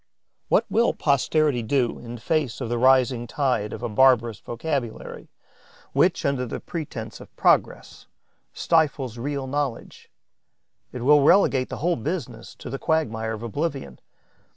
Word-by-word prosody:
What 230 - +3
will 225 +3 +2
posterity 145 -1 +1
do 120 +1 0
in 120 0 -8
face 135 +1 -1
of 125 -4 -4
the 120 0 -1
rising 130 -1 +3
tide 125 -8 -1
of - - -7
a - - 0
barbarous 120 -2 +3
vocabulary 120 +1 -5 0.6
which, - - +2
under 135 -3 0
the - - -5
pretence 125 -9 -7
of - - -15
progress, - - +1 0.4
stifles 140 -7 0
real 140 +1 -3
knowledge? 140 -2 -4 0.8
It 125 -2 -6
will 145 +2 +6
relegate 140 -5 +4
the - - -5
whole 175 0 +2
business 125 -4 -5
to - - -9
the 135 - -4
quagmire 110 -9 -1
of 110 +1 -7
oblivion. 135 - -4
130 Hz, 140 wpm, -24 LUFS, 115-145 Hz, 0.8 s, will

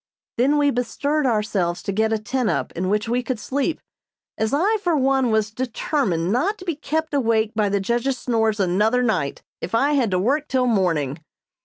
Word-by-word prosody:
Then 280 +4 +3
we 290 -1 +3
bestirred 280 +4 -1
ourselves 210 -6 0
to - - -2
get 220 +3 +1
a 220 - +2
tent 235 +2 -1
up - - -1
in 185 +2 -3
which 210 +2 0
we 245 +2 0
could 250 -2 -3
sleep, 280 +7 -2 0.6
as 220 0 -1
I, 390 +10 +2
for 350 -6 0
one, 265 -2 +2
was 220 -1 +1
determined 220 - -1
not 360 - +1
to 370 - -11
be 340 - -1
kept 315 +1 -3
awake 225 -5 +1
by 215 -2 +1
the 200 0 +1
judge's 240 +6 -1
snores 225 -4 0
another 210 +7 +2
night 185 -12 -1 0.2
if - - -3
I 275 +5 +3
had 265 -7 +2
to 185 - +1
work 275 +10 0
till 255 -1 +1
morning. 165 - 0
235 Hz, 195 wpm, -22 LUFS, 210-275 Hz, 0.6 s, Then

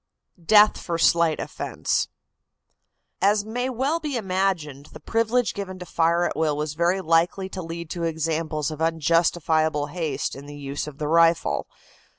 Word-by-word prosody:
DEATH 210 +4 +6
FOR 170 -2 -3
SLIGHT 170 -1 +3
OFFENSE. - - -2 1.1
As 205 +2 +3
may 245 +4 -2
well 270 +6 0
be 295 -5 -3
imagined, 185 - -2
the 155 - -12
privilege 230 +6 0
given 190 -2 -6
to 180 - -8
fire 170 0 +1
at - - -2
will 155 -2 0
was 150 0 -2
very 170 +4 +1
likely 170 +3 +1
to 190 - -6
lead 165 -1 -7
to 175 - -4
examples 160 -2 -2
of 155 0 -7
unjustifiable 160 -2 +1
haste 160 -6 -2
in 140 +1 -10
the 145 0 -9
use 140 +1 -4
of 145 -2 -9
the 150 - -3
rifle. 165 +1 +3
165 Hz, 160 wpm, -24 LUFS, 155-190 Hz, 1.1 s, DEATH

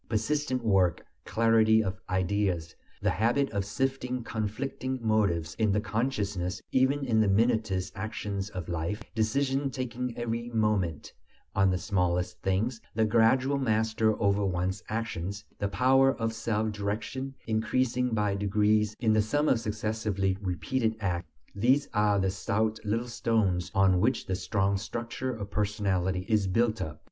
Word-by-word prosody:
Persistent 130 +3 0
work, 95 -5 +2 0.2
clarity 110 -1 +4
of 95 +1 -3
ideas, 95 -3 0 0.3
the - - +3
habit 120 +8 +1
of 100 -2 -1
sifting 125 +3 -2
conflicting 120 +5 -3
motives 100 -8 +1
in 110 -3 +3
the 105 - +2
consciousness, 105 -5 -2
even 135 +2 +2
in 110 -3 +3
the 110 - +3
minutest 105 -3 +1
actions 100 -1 -4
of 90 -5 -6
life, 85 +5 -3
decisions 135 +4 0
taken 125 -1 -3
every 120 0 -3
moment 105 -8 0 0.4
on 95 0 +4
the 90 - +1
smallest 90 -2 -1
things, 110 +5 0
the 110 0 +3
gradual 125 +5 +3
master 110 -2 +1
over 100 -1 +2
one's 95 0 -1
actions, 100 -3 -3
the 100 - 0
power 135 +6 +4
of 115 -1 -2
self 110 -1 -1
direction 110 +6 -4
increasing 125 +3 +1
by 105 -2 +1
degrees 105 +1 +2
in 110 -3 +3
the 110 - +4
sum 145 +8 0
of 120 - +3
successively 105 -3 -1
repeated 105 +6 -1
acts, 90 -4 -2 0.3
these 130 +8 +2
are 105 -1 +3
the 95 -1 +1
stout 110 +3 -1
little 115 +3 -1
stones 105 -7 0
on 95 -2 +4
which 120 +7 +1
the 95 - -2
strong 100 0 0
structure 115 +5 -4
of 100 -4 -6
personality 95 -3 0
is 105 -4 +2
built 115 +3 +1
up. 75 -2 -4
110 Hz, 145 wpm, -29 LUFS, 95-115 Hz, 0.4 s, clarity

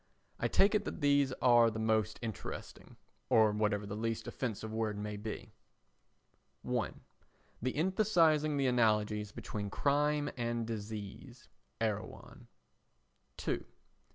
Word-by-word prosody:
I - - +1
take 200 +2 +4
it 210 -1 +2
that - - -5
these 140 -2 +4
are 120 -2 +6
the 110 - -5
most 110 -1 +1
interesting—or 110 0 -1
whatever 105 -1 0
the 100 - -5
least 115 +1 -2
offensive 110 -3 -4
word 110 -2 -1
may 105 0 -4
be: 105 +1 -6 1.1
1. - - -2 0.6
The 130 +2 -1
emphasising 160 -4 +3
the 140 - +1
analogies 105 -4 +2
between 100 -1 -5
crime 145 +5 +1
and 120 -1 -1
disease. 110 +3 -7 0.3
[Erewhon.] 110 -2 -4 0.9
2. - - -2
115 Hz, 115 wpm, -33 LUFS, 105-140 Hz, 1.1 s, are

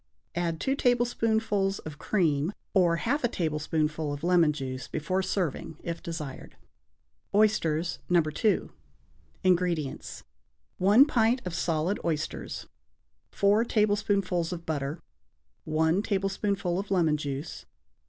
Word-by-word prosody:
Add 170 -1 -1
two 270 - 0
tablespoonfuls 225 -6 +1
of 155 -1 -9
cream 160 -2 +1 0.2
or 175 -4 +4
half 255 - -1
a - - +4
tablespoonful 155 -3 -1
of 145 +1 -6
lemon 175 -3 +4
juice 130 -3 -5
before 185 +5 -1
serving, 180 -5 -2
if 170 0 -4
desired. 165 -6 -6 0.8
=Oysters, 170 -6 +2
No. 175 -1 +5
2.= 155 +7 0 0.7
INGREDIENTS. 175 -6 0 0.6
1 205 +9 +7
pint 240 -3 +2
of 180 - -4
solid 170 +3 0
oysters. 155 -2 -3 0.6
4 205 +3 +3
tablespoonfuls 205 -6 +1
of 170 -1 -6
butter. 150 0 -2 0.7
1 160 +4 +2
tablespoonful 195 -2 -1
of 200 - -5
lemon 170 -6 +3
juice. 145 +1 -5
175 Hz, 115 wpm, -28 LUFS, 155-200 Hz, 0.8 s, 1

